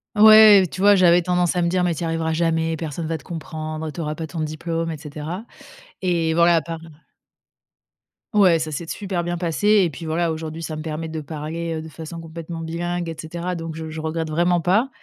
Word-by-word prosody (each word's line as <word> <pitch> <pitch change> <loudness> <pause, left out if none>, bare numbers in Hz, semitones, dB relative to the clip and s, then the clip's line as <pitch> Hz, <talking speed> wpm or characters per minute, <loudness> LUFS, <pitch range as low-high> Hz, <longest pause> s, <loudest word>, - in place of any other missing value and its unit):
Ouais, 215 -2 +9
tu 185 - -6
vois, 205 0 +7
j'avais 175 -1 +5
tendance 180 0 +1
à 175 - +1
me 170 - +1
dire: 180 0 +1
«Mais 170 -2 0
tu - - -7
y - - -1
arriveras 165 0 -1
jamais, 165 0 0
personne 160 0 -5
va 165 0 -2
te 140 - -17
comprendre, 155 -2 -5
tu 170 - -6
auras 150 -1 -2
pas 160 +1 -6
ton 160 +2 -5
diplôme 165 +2 -3
et 155 - -5
cetera». 155 +7 -7 0.6
Et 170 -3 +1
voilà, 170 +1 +5
à 165 - +3
part 165 +1 -6 1.5
Ouais, 185 -6 +5
ça 155 0 -3
s'est 160 +3 -4
super 185 -1 -3
bien 175 0 -2
passé 170 +4 -1 0.2
et 175 - +1
puis 160 +2 -9
voilà, 165 +1 0
aujourd'hui, 160 +1 -5
ça 155 -1 -4
me 155 - -5
permet 160 +1 -4
de 160 0 -4
parler, 160 +3 -5
heu, 155 - -4
de 160 - -9
façon 165 +2 -8
complètement 165 0 -7
bilingue 170 +1 -3
et 165 - -5
cetera. 170 +3 -4
Donc 165 -1 -6
je 160 0 -6
je 155 0 -6
regrette 160 0 -3
vraiment 175 +2 +2
pas, 205 - +2
165 Hz, 225 wpm, -22 LUFS, 160-175 Hz, 1.5 s, Ouais